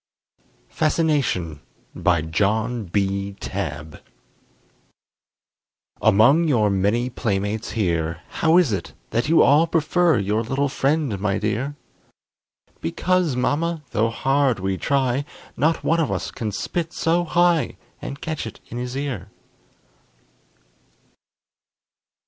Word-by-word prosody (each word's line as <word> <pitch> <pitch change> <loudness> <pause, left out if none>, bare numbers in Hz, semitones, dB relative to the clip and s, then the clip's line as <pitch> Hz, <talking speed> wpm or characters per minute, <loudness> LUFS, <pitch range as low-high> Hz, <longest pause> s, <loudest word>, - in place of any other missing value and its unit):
FASCINATION 145 - 0 0.3
BY 85 -3 +1
JOHN 110 +7 0
B. 100 +1 -1
TABB 80 -5 -5 2.0
Among 115 +11 +5
your 110 -8 +3
many 105 +6 +1
playmates 105 -1 -2
here, 85 -6 -1
How 160 +1 +3
is 165 -11 +3
it 95 -4 -4 0.2
that 115 +6 0
you 165 - +6
all 150 +4 +5
prefer 170 +1 +2
Your 105 +2 0
little 135 +5 -1
friend, 140 -6 0
my 100 0 0
dear? 110 +8 -2 1.0
"Because, 175 - 0
mamma, 155 +5 0
tho' 115 0 +1
hard 135 -1 +1
we 95 0 -1
try, 135 +3 0 0.3
Not 160 +2 +1
one 165 - +2
of 160 - 0
us - - -3
can 110 -4 -4
spit 120 - -3
so 170 +2 +1
high, 175 -1 +2 0.2
And 140 +2 -7
catch 155 -7 -3
it 110 - -10
in 120 - -5
his 125 +1 -4
ear." 135 -10 -4
120 Hz, 115 wpm, -22 LUFS, 100-155 Hz, 2.0 s, you